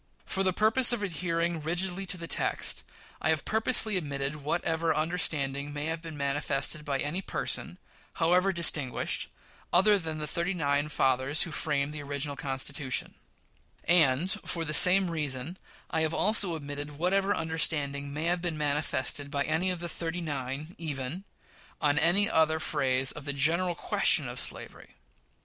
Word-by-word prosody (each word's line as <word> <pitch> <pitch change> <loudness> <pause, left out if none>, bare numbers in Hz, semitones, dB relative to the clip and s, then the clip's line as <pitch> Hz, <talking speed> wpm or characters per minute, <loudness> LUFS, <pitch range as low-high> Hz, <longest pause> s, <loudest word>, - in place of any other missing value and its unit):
For 195 - -1
the 190 -1 +2
purpose 220 +7 +5
of 225 -4 -2
adhering 170 -2 -2
rigidly 180 +4 -2
to 180 - -2
the 170 - -6
text, - - 0 0.4
I 155 - 0
have 160 -2 0
purposely 220 -2 +2
omitted 140 -2 -4
whatever 160 +2 -1
understanding 145 -3 -1
may 145 0 -4
have 160 0 -3
been 165 -2 -9
manifested 140 +1 0
by 140 -2 -2
any 150 +7 -2
person, - - -2 0.4
however 180 +4 +2
distinguished, 155 -7 +1 0.4
other 200 +3 +5
than 160 -3 -5
the 150 - -4
thirty 170 +5 -2
nine 145 -2 0
fathers 135 +1 +1
who 170 - -6
framed 150 -2 -1
the 150 - -6
original 145 0 -4
Constitution; 135 0 -2 0.7
and, 165 0 +3
for 165 -2 -2
the 155 - -2
same 180 +2 +7
reason, 150 0 -3 0.4
I 160 - 0
have 160 0 0
also 200 -4 +3
omitted 145 -1 -7
whatever 195 +4 +1
understanding 145 -3 -1
may 150 +2 -4
have 175 +1 0
been 170 -3 -3
manifested 145 -1 -1
by 140 0 -1
any 160 +5 +1
of 180 -2 -2
the 175 - -3
"thirty 170 +1 -4
tine" 140 +2 -5
even 150 +3 -5 0.5
on 145 0 +2
any 195 +6 +3
other 160 -5 +2
phase 130 -4 +1
of 150 - -10
the 145 - -3
general 170 +6 +1
question - - +2
of - - -6
slavery. - - -5
160 Hz, 160 wpm, -28 LUFS, 145-175 Hz, 0.7 s, same